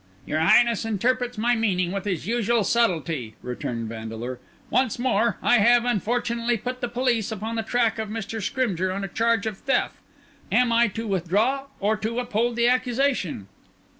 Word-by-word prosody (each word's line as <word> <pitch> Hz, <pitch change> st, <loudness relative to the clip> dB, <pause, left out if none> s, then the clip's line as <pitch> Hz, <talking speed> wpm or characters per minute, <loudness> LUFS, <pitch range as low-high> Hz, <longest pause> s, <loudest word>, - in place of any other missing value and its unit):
"Your 155 Hz, -, -1 dB
Highness 235 Hz, +8 st, +4 dB
interprets 245 Hz, +3 st, -1 dB
my 235 Hz, +3 st, +2 dB
meaning 185 Hz, -6 st, 0 dB
with 195 Hz, +1 st, -4 dB
his 185 Hz, -6 st, -2 dB
usual 230 Hz, +1 st, +1 dB
subtlety," 165 Hz, -, 0 dB
returned 120 Hz, -2 st, -4 dB
Vandeleur. 115 Hz, +2 st, -6 dB, 0.3 s
"Once 255 Hz, -4 st, +1 dB
more: 235 Hz, -4 st, +1 dB
I 245 Hz, -, +5 dB
have, 240 Hz, +3 st, +5 dB
unfortunately, 235 Hz, +1 st, 0 dB
put 250 Hz, +4 st, -5 dB
the 245 Hz, -, -1 dB
police 240 Hz, -3 st, 0 dB
upon 220 Hz, +2 st, -4 dB
the 225 Hz, -, 0 dB
track 230 Hz, 0 st, 0 dB
of 220 Hz, -1 st, -3 dB
Mr. 220 Hz, 0 st, -4 dB
Scrymgeour 190 Hz, -5 st, -1 dB
on 195 Hz, +1 st, -3 dB
a -, -, -2 dB
charge 230 Hz, +2 st, +1 dB
of 215 Hz, -3 st, -4 dB
theft; 275 Hz, -, 0 dB, 0.5 s
am 250 Hz, -1 st, +3 dB
I 235 Hz, +1 st, +4 dB
to 225 Hz, +2 st, -5 dB
withdraw 205 Hz, +8 st, 0 dB
or 210 Hz, +2 st, +1 dB
to 220 Hz, +3 st, -3 dB
uphold 240 Hz, -1 st, 0 dB
the 235 Hz, 0 st, +3 dB
accusation?" 250 Hz, -, 0 dB
225 Hz, 165 wpm, -24 LUFS, 195-240 Hz, 0.5 s, I